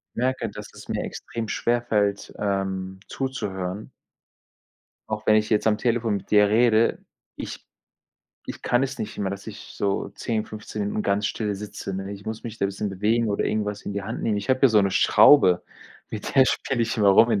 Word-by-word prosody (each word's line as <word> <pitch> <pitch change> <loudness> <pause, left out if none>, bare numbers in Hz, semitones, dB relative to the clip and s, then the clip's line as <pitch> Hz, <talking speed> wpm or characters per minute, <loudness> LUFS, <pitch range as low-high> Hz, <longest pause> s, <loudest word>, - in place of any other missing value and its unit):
Merke, 130 -2 -1
dass 105 0 -9
es - - -13
mir - - -1
extrem 115 -2 -6
schwerfällt, 110 -4 0
ähm, 95 -2 -2
zuzuhören. 105 -7 -4 1.2
Auch 110 0 -3
wenn 110 - +5
ich 110 0 +2
jetzt 110 0 +2
am 105 -1 +3
Telefon 115 -3 0
mit - - -13
dir 105 -1 +6
rede, 115 +1 +3 0.4
ich - - -7 0.8
ich - - -7
kann 125 +2 +2
es 135 +1 -5
nicht 105 - -5
immer, 100 - -1
dass 100 +2 -7
ich 110 - -10
so 100 -1 -1
10, 110 -2 -2
15 110 0 -6
Minuten 105 +1 -2
ganz 100 +1 +1
still 105 -1 -2
sitze, 100 -1 -6
ne? 95 +1 -5
Ich 100 0 -10
muss 110 0 -6
mich 115 -2 -7
da - - 0
'n 100 - +2
bisschen 100 +1 -3
bewegen 110 +4 +1
oder 100 - 0
irgendwas 105 -1 -2
in - - -5
die 100 0 -3
Hand - - -5
nehmen. 105 -2 +1
Ich 100 - -4
habe 130 0 +2
hier 135 - +7
so 110 -2 +5
'ne 100 -1 +1
Schraube, 90 -12 +6 0.5
mit 105 - -5
der 135 -2 +7
spiele 130 -2 -1
ich 115 +2 -2
immer 105 -3 +4
rum 115 +4 +6
in 105 - +2
105 Hz, 205 wpm, -24 LUFS, 100-115 Hz, 1.2 s, hier